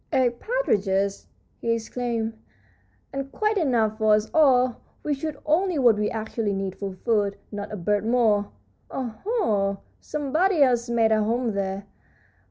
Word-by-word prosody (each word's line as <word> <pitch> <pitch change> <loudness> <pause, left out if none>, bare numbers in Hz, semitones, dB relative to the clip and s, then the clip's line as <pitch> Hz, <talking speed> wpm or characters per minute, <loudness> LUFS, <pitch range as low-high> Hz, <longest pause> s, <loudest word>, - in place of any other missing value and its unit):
"Eight 250 -4 +2
partridge," 480 - 0 0.7
he 230 - -1
exclaimed, 230 0 -2 0.8
"and 275 0 -4
quite 425 +3 +1
enough 230 -8 +1
for 215 -1 +5
us 215 +1 -2
all! 255 -5 +4 0.3
We 300 - 0
shoot 290 +1 -4
only 345 +3 +2
what 240 -5 +5
we 210 - +1
actually 220 -1 -2
need 195 -1 -3
for 195 -2 -5
food, 205 -4 +1
not 205 -1 -5
a 210 - -4
bird 205 +3 0
more. 220 -3 +2 0.4
Oho! 220 - -1 0.2
somebody 305 +4 +1
else 245 -2 +2
made 230 -2 +3
a 215 0 +3
home 230 +1 0
here. 195 0 -3
230 Hz, 145 wpm, -25 LUFS, 210-275 Hz, 0.8 s, for